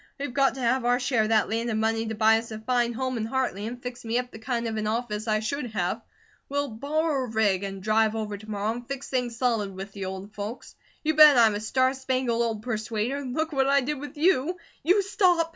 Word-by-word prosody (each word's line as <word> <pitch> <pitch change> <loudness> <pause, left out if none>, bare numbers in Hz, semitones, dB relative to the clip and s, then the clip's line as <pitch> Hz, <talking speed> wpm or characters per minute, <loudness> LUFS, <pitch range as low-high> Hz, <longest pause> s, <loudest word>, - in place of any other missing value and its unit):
We've 275 -3 -4
got 275 -1 +3
to 265 - -6
have 250 +1 +2
our 245 +1 +2
share 250 -3 +1
of 215 - -1
that 220 -2 +3
land 230 +2 -1
and 220 -1 0
money 225 0 0
to 220 - -3
buy 220 +1 +5
us 230 - -9
a 220 - -6
fine 240 +1 +1
home 255 +1 -2
in 220 - -2
Hartley, 225 -4 -2
and 245 +1 -7
fix 245 -1 -6
me 230 +1 -1
up 250 0 -2
the 220 - -10
kind 235 0 -2
of 220 -1 -3
an 215 0 -1
office 220 -1 -2
I 215 0 +1
should 255 +4 -2
have. 180 -3 -1 0.5
We'll 285 0 -1
borrow 280 +4 -1
a - - -8
rig 210 -4 +2
and 195 -1 -5
drive 220 +1 +2
over 215 -2 -3
to 215 +2 -11
morrow 210 +1 -1
and 240 +1 -7
fix 275 0 -5
things 245 -3 -1
solid 225 -6 0
with 195 +1 -7
the 195 -1 -6
old 190 +2 -6
folks. 210 +4 -7 0.3
You 315 0 +2
bet 300 -3 +8
I'm 225 -3 +6
a 205 - -2
star 260 +4 +1
spangled 260 -3 -1
old 225 -2 -1
persuader, 225 +3 -2
look 310 +5 -2
what 270 -1 +2
I 280 0 +4
did 290 +2 -3
with 290 +2 -8
you 345 +1 +2
" - - -33
"You 375 +6 +4
stop!" 360 -4 +2
235 Hz, 250 wpm, -26 LUFS, 220-265 Hz, 0.5 s, bet